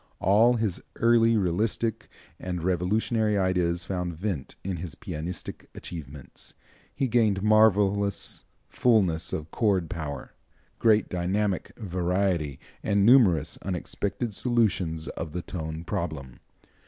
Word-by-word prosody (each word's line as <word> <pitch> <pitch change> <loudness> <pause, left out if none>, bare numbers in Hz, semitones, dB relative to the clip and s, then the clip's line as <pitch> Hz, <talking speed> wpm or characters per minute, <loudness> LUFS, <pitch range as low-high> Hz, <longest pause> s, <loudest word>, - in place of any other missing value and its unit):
All 110 +5 +5
his 110 -6 -1
early 115 -1 +4
realistic 105 +4 -1 0.3
and 90 -2 -4
revolutionary 105 +4 +1
ideas 90 -2 +1
found 90 -2 -3
vent 90 -5 -4
in 95 -2 -3
his 80 -3 -6
pianistic 80 +5 -6
achievements. 75 -5 -8 0.4
He 135 -1 0
gained 110 -5 +2
marvelous 100 -2 +3 0.2
fulness 95 -9 +2
of 80 +1 -4
chord 95 -7 +1
power, 75 -4 -5 0.5
great 110 -2 +4
dynamic 95 +2 -1
variety, 90 - -1 0.2
and 100 -1 +2
numerous 100 - +5
unexpected 100 +4 -3
solutions 95 -9 0
of 80 -2 -6
the 90 0 -3
tone 80 -2 -5
problem. 75 -8 -4
95 Hz, 110 wpm, -27 LUFS, 85-110 Hz, 0.5 s, All